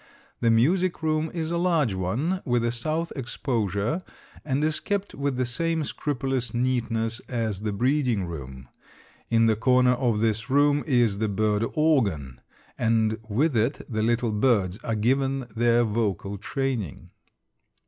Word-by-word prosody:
The 115 - +2
music 170 +11 +2
room 155 0 +1
is 165 -2 -3
a 170 - 0
large 165 - +2
one, 120 - -1
with 120 -1 +1
a 120 - +1
south 155 +8 -2
exposure, 120 - -2 0.4
and 140 0 -1
is 155 0 +1
kept 200 -1 -2
with 140 -1 -2
the 130 - +1
same 160 +6 -1
scrupulous 135 -5 -2
neatness 120 -2 0
as 115 -5 -2
the 105 -1 -2
breeding 125 -2 +1
room. 65 -6 -8 0.6
In 115 -1 +4
the 110 -1 +3
corner 125 +2 +4
of 120 -4 0
this 115 +2 0
room 145 +1 +3
is 120 -7 +2
the 110 -1 0
bird 105 +1 +1
organ, 100 - +1 0.4
and 110 -1 +1
with 135 +7 +1
it 115 +6 +1
the 110 -3 -2
little 115 +1 +1
birds 105 -4 +1
are 115 - -1
given 135 +4 +1
their 120 +1 +3
vocal 105 -3 -2
training. 125 - -3
120 Hz, 150 wpm, -25 LUFS, 110-140 Hz, 0.6 s, In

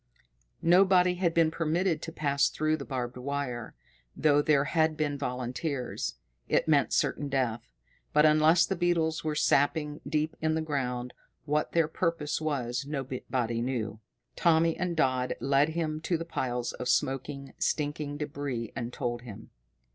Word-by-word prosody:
Nobody 180 +1 +5
had 180 -1 +1
been 165 -1 +3
permitted 165 +1 0
to 165 - -6
pass 140 -3 +1
through 155 0 0
the 140 -3 -7
barbed 125 -2 -4
wire, 125 -3 -4 0.4
though 145 -1 +4
there 145 -2 +3
had 160 +1 +1
been 145 -2 0
volunteers. 125 +1 -3 0.3
It - - +2
meant - - +3
certain 145 - 0
death. 125 - -1 0.4
But, 150 +1 +5
unless 155 +2 +5
the 195 - -2
beetles 170 -2 +1
were 155 -1 -1
sapping 150 +1 +1
deep 155 +1 0
in 155 0 +1
the 160 - 0
ground, 125 -5 -2 0.3
what 150 0 0
their 165 -2 +3
purpose 165 -2 -1
was, 130 -4 -1
nobody 130 -4 -2
knew. 120 -4 -2 0.4
Tommy 165 -1 +3
and 175 -2 -2
Dodd 130 -3 +1
led 140 +2 +3
him 155 -1 -2
to 170 +1 0
the 165 - -5
piles 125 -6 -2
of 125 - -4
smoking, 135 +2 -1
stinking 145 -1 -1
débris 140 -6 -4
and 120 +1 -4
told 120 -1 -3
him. 110 -3 -11
145 Hz, 150 wpm, -29 LUFS, 130-160 Hz, 0.4 s, Nobody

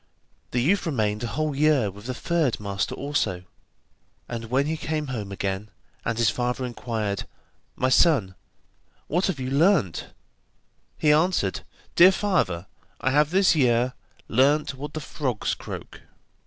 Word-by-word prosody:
The 120 -1 0
youth 195 +5 +2
remained 110 -7 0
a - - -1
whole 150 +3 -2
year 140 -8 +3
with 100 +4 -12
the 130 - -3
third 165 -6 0
master 100 -2 -2
also, 110 -11 -1 0.8
and 115 -1 -5
when 130 +5 +1
he 160 +2 -1
came 155 -2 -3
home 105 -4 -5
again, 100 +1 -3 0.3
and 115 -1 -2
his 115 -2 +3
father 125 +1 -2
inquired: 110 -5 -3 0.5
'My 130 - +1
son, 130 - +4 0.7
what 175 +5 0
have 190 -8 -2
you 130 0 -3
learnt?' 150 - +2 0.9
he 150 - +3
answered: 155 - +1 0.3
'Dear 180 +2 +8
father, 100 - 0 0.3
I 130 - +1
have 150 +2 +3
this 185 0 +4
year 125 -3 +2 0.3
learnt 140 +5 +3
what 145 +2 -7
the 155 - -3
frogs 130 -6 -2
croak. - - -8
130 Hz, 145 wpm, -25 LUFS, 110-155 Hz, 0.9 s, Dear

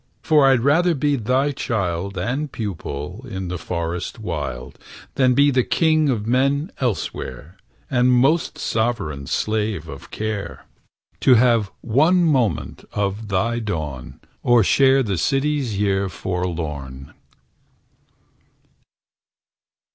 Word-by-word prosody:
For 150 -3 +5
I'd 130 -3 +4
rather 165 +6 +3
be 145 0 +1
thy 130 +4 +1
child 100 -7 -2
And 135 +11 -2
pupil, 90 - -5
in 95 -1 -5
the 90 -1 -4
forest 85 +4 -4
wild, 70 - -5 0.3
Than 130 -2 +3
be 145 +2 +5
the 130 -1 +3
king 155 0 +2
of 110 -5 -1
men 140 - +1
elsewhere, 100 - -4 0.3
And 125 -1 +2
most 135 +7 +2
sovereign 100 - -2
slave 105 -6 -1
of 70 -3 -10
care; 110 -2 -5 0.5
To 130 - +5
have 115 -3 +3
one 155 +10 +3
moment 135 -9 0
of 100 +2 -2
thy 115 +5 0
dawn, 80 - -5 0.2
Than 120 -2 +5
share 135 +5 +4
the 100 -6 -2
city's 135 - 0
year 100 -1 +1
forlorn. 80 -8 -4
110 Hz, 115 wpm, -21 LUFS, 90-135 Hz, 0.5 s, For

